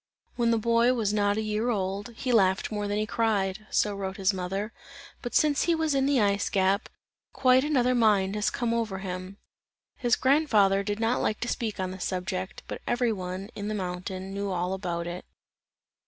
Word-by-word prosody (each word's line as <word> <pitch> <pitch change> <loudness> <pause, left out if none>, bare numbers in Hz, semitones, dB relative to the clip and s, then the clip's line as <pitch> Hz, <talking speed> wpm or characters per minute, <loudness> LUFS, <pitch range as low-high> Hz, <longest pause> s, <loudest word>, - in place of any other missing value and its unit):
"When 235 -1 +1
the 230 - +3
boy 235 +3 +3
was 215 -4 0
not 205 0 +2
a 220 - 0
year 215 +3 -1
old, 200 +1 -2
he 255 +2 -2
laughed 190 -4 +3
more 205 -1 -2
than 205 0 -1
he 215 - 0
cried," 215 -2 0
so 210 - +1
wrote 195 0 -4
his 195 0 +2
mother, 195 +4 -3 0.5
"but 240 - -5
since 295 -2 +3
he 340 - +3
was 320 -2 0
in 270 0 +2
the 280 -2 +3
ice 200 -1 +2
gap, 195 +1 +1 0.4
quite 255 0 +4
another 255 -4 +2
mind 210 -5 +3
has 210 +2 +1
come 235 -1 -1
over 225 -4 -1
him." 185 0 -6 0.6
His 245 -2 +2
grand 290 +4 +2
father 195 -2 +4
did 205 +1 -3
not 230 +2 +1
like 215 - 0
to 240 - -2
speak 225 -4 -3
on 185 -1 -2
the 190 - -8
subject, 185 0 -3
but - - -6
every 240 -2 +1
one 185 +2 -5
on 205 0 -4
the 215 - -2
mountain 185 0 -4
knew 200 0 -2
all 180 0 -1
about 175 -3 -3
it. 175 +1 -5
205 Hz, 200 wpm, -27 LUFS, 190-235 Hz, 0.6 s, quite